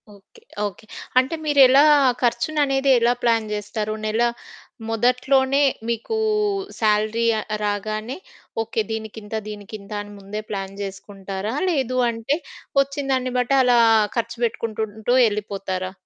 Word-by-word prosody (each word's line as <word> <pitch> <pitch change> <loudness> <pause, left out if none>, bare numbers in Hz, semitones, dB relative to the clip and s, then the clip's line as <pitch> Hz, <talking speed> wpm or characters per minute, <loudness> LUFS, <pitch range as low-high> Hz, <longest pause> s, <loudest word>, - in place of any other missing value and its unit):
Okay. 200 -1 -20 0.3
Okay. 190 0 -11 0.3
అంటే, 260 +5 +3
మీరెలా 280 -2 +6 0.4
ఖర్చుననేది 275 +2 +1
ఎలా 235 +1 +3
ప్లాన్ 225 -2 +2
జేస్తారు? 210 +1 -3
నెల 215 +2 0 0.7
మొదట్లోనే 260 +4 +2 0.3
మీకూ 235 - -2 0.6
శాలరీ 215 +1 +2
ఆహ్, - - -6 0.2
రాగానే 215 +4 -2 0.5
ఓకే. 225 0 -2
దీనికింత, 220 -1 -6 0.2
దీనికింత 205 0 -9
అని 205 0 -10
ముందే 200 +2 -6
ప్లాన్ 195 -1 -4
జేసుకుంటారా, 195 +2 -5
లేదు 260 -6 0
అంటే 230 +5 -1 0.5
ఒచ్చిన 280 +1 -6
దాన్ని 255 -1 -1
బట్టి 250 +2 +1
అలా 245 -1 +4 0.4
ఖర్చు 230 0 -2
పెట్టుకుంటుంటూ 220 0 -2
యెళ్ళిపోతారా? 195 -3 -3
225 Hz, 110 wpm, -22 LUFS, 210-255 Hz, 0.7 s, మీరెలా